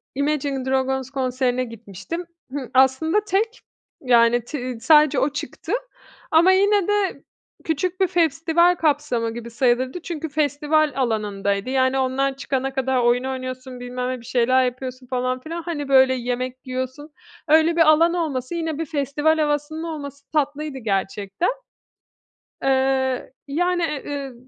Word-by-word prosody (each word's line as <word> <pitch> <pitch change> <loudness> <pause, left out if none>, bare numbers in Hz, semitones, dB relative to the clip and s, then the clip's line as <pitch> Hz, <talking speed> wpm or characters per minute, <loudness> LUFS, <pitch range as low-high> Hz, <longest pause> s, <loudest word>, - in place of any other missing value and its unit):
Imagine 280 -2 -1
Dragons 265 0 0
konserine 255 -1 0
gitmiştim. 230 - -7 0.3
Hı, 270 -3 -5
aslında 265 +8 +4
tek, 435 +4 -1 0.4
yani, 240 -2 +4
ti 280 +5 -5
iii, 250 -2 -5
sadece 300 +1 +5
o 275 - +2
çıktı, 290 +4 -6 0.6
ama 335 +4 +6
yine 400 0 +3
de, 415 -2 0 0.4
küçük 350 +4 -2
bir 380 - +5
festival 340 0 +3
kapsamı 290 -8 0
gibi 235 0 -7
sayılırdı. 255 +6 0
Çünkü, 320 -2 -5
festival 300 0 +1
alanındaydı. 205 -4 -1
Yani, 260 0 +2
onlar 270 +1 0
çıkana 270 -1 -2
kadar, 265 -1 0
oyun 240 +1 +3
oynuyorsun 255 -1 -5
bilmem 250 0 -4
ne, 255 0 -3
bir - - -15
şeyler 255 +1 +3
yapıyorsun 255 0 -5
falan 255 0 -1
filan, 335 +4 -5
hani, 295 -5 -4
böyle, 260 -1 +6
yemek 255 +1 -4
yiyorsun, 260 +4 -5 0.4
öyle 320 +2 +4
bir 335 - +3
alanı 335 +2 +4
olması, 260 0 -4
yine 320 -3 -2
bir 325 - -1
festival 295 +1 0
havasının 295 +1 -1
olması, 285 -3 -7
tatlıydı 295 -1 -1
gerçekten. 200 - -1 1.2
Eee, 265 -1 +1 0.2
yani, 355 +4 0
eee, 285 -2 -3
ııı, 260 - -10
270 Hz, 140 wpm, -22 LUFS, 255-315 Hz, 1.2 s, ama